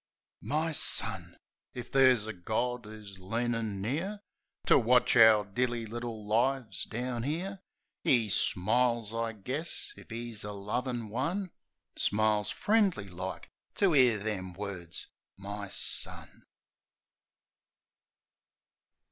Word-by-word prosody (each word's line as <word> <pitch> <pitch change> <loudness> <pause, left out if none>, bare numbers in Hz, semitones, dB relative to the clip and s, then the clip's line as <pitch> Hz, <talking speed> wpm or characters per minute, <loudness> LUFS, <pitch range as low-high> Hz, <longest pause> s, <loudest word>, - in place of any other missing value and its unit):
My 155 +3 0
son!... 155 - +2 0.4
If 120 -1 -7
ther's 130 -5 +5
a 110 - -5
Gawd 110 +5 -2
'Oo's 105 -3 -11
leanin' 115 0 -2
near 175 - -2 0.4
To - - +6
watch 125 +1 +4
our 110 -3 +7
dilly 120 +3 -1
little 115 -1 -6
lives 120 +3 0
down 120 0 -3
'ere, 180 +8 -3 0.4
'E 120 -4 +3
smiles, 115 +4 +1
I 115 0 -2
guess, 145 - -5
if - - -15
'E's 115 -1 -6
a 105 0 -5
lovin' 115 +3 -3
one 170 - -2 0.2
— - - -55
Smiles, 105 -1 +2
friendly 200 - +1
like, 90 +1 -6 0.2
to 195 -4 +3
'ear 125 -6 +5
them 100 -3 -4
words 90 -3 -5 0.2
— - - -63
My 100 0 -4
son. 95 - -1
115 Hz, 115 wpm, -30 LUFS, 105-130 Hz, 0.4 s, our